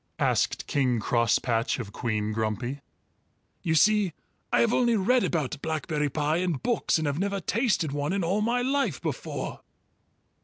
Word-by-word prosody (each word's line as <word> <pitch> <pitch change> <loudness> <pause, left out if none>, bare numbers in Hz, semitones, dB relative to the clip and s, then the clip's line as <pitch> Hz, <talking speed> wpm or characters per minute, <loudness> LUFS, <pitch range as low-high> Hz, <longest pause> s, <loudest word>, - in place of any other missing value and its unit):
asked - - +1
King 130 -4 +1
Crosspatch 115 +1 +1
of 110 -5 -6
Queen 110 -2 -1
Grumpy. 115 +5 -2 0.8
"You 160 -2 0
see, 205 +1 +4 0.4
I - - +4
have 235 0 +3
only 240 -2 +3
read 240 +5 +3
about 145 -4 -1
blackberry 155 -2 -1
pie 150 +3 0
in 180 -1 0
books 225 - 0
and 160 - -2
have 145 +1 -1
never 200 +1 -1
tasted 200 - 0
one 145 +2 -2
in 195 -1 0
all 190 +5 +1
my 240 +3 +1
life 275 +2 0
before." - - -4
160 Hz, 155 wpm, -27 LUFS, 130-210 Hz, 0.8 s, see